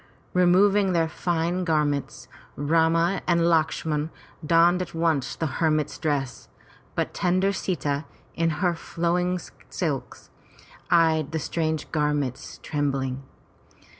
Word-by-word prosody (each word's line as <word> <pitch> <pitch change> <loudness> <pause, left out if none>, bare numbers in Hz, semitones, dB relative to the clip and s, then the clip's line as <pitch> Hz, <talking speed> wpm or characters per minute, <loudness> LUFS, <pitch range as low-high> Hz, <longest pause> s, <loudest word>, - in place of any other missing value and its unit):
Removing 190 +2 +4
their 165 -1 +2
fine 170 +2 -1
garments, 150 -4 -1 0.3
Rama 165 +4 +2
and 170 -1 +3
Lakshman 160 -2 +1 0.3
donned 170 +3 +4
at 175 -2 -6
once 155 -5 0
the 160 - -2
her 160 +2 0
mit's 155 -1 -1
dress, 140 -6 -2 0.5
but - - -1
tender 185 +2 +1
Sita 155 -6 -2 0.3
in 165 0 +1 0.2
her 175 - +3
flowing 175 +2 -1 0.3
silks, - - -4 0.6
eyed 160 -4 +3
the - - 0
strange 160 0 -2
gar 150 -1 +1
ment 135 -3 -4
trembling. 135 -3 -2
165 Hz, 115 wpm, -25 LUFS, 150-175 Hz, 0.6 s, Removing